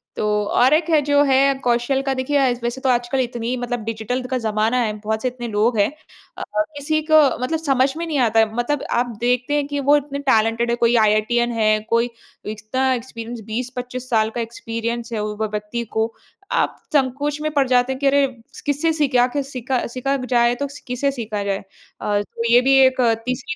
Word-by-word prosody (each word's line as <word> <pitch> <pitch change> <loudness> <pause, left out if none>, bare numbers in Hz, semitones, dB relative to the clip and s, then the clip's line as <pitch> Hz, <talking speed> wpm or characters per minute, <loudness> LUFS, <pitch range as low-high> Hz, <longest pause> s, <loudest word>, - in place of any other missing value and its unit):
तो - - -2 0.3
और 255 +4 +5
एक 320 +1 +2
है 310 -2 +4
जो 285 0 +3
है 275 0 +4
कौशल 245 +3 +1
का 270 - +2
देखिए 260 +3 0
आज 250 -3 +1
वैसे 240 +2 -3
तो 265 - +1
आजकल 245 +2 +1
इतनी 240 -1 -2
मतलब 245 -1 -3
डिजिटल 225 +3 -3
का 255 - +1
ज़माना 220 +1 0
है, 230 -3 +1
बहुत 220 +1 -2
से 255 - 0
इतने 245 -1 -5
लोग 220 +1 +1
हैं 200 - +4 0.5
और 310 - -1
किसी 310 +2 0
को 315 - +8 0.3
मतलब 320 +4 -1
समझ 270 -3 +2
में 335 - -3
नहीं 315 -3 -2
आता 225 0 +2
है, 220 0 +2
मतलब 260 +4 -1
आप 240 +1 +2 0.2
देखते 250 +3 +1
हैं 290 -1 +1
कि 285 -1 -3
वो 290 - +7
इतने 285 0 -4
टैलेंटेड 225 +1 +2
हैं 235 - +1
कोई 235 +1 +3
आईआईटीएन 220 +3 +2
है, 215 -1 +2
कोई 235 +1 +2 0.4
इतना 255 +5 -1
एक्सपीरियंस 235 -1 -6
20-25 250 +2 -5
साल 220 -2 +2
का 240 - -1
एक्सपीरियंस 230 0 -4
है 220 - -1
वो 210 0 -4
व 215 - 0
व्यक्ति 210 +3 -3
को 225 +1 0 0.4
आप - - 0 0.2
संकोच 285 +2 0
में 310 0 -1
पड़ 280 -2 +2
जाते 250 +1 +2
हैं 260 - -8
कि 280 - +1
अरे 280 0 +4 0.4
किससे 295 +3 +1
सीखा 275 -5 +2
आखिर 270 +3 0
सीखा 260 -1 -3
सीखा 260 +3 -2
जाए 240 -1 +3
तो 285 +3 -3 0.2
किससे 255 +3 0
सीखा 215 -6 -4
जाए? 195 -1 -2 0.4
अ, 205 -1 0
तो 230 +3 -4
ये 245 - +7
भी 270 +1 +4
एक 260 0 +2
अ, 230 -2 +4
तीसरी 255 +4 -3
245 Hz, 210 wpm, -21 LUFS, 230-270 Hz, 0.5 s, को